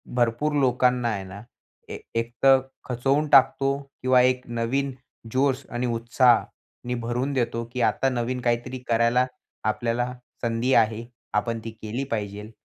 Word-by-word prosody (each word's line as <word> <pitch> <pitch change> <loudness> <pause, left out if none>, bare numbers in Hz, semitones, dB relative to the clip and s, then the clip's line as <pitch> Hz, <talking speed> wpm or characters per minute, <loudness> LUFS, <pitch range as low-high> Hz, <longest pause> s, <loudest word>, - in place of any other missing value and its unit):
भरपूर 120 +5 +1
लोकांना 125 -2 +2
आहे 100 -3 -3
ना, 95 +2 -10 0.5
ए - - -5 0.2
एक 115 +1 -1
तर 135 -1 +7 0.3
खचवून 135 +5 +1
टाकतो, 135 0 +4 0.2
किंवा 130 0 +5
एक 125 0 +2
नवीन 125 +4 -1 0.4
जोश 135 +1 +1
आणि 120 +1 -2
उत्साहाने 120 +1 +1
भरून 125 +4 -2
देतो, 115 -2 -1
की 125 - -2
आता 135 +3 +2
नवीन 125 0 -2
काहीतरी 120 +2 -1
करायला 115 +2 +3 0.4
आपल्याला 120 +3 -1 0.3
संधी 120 +2 0
आहे, 110 +1 +2 0.3
आपण 115 +2 0
ती 115 - -6
केली 110 +5 -3
पाहिजेल 105 0 -4
120 Hz, 140 wpm, -25 LUFS, 115-130 Hz, 0.5 s, तर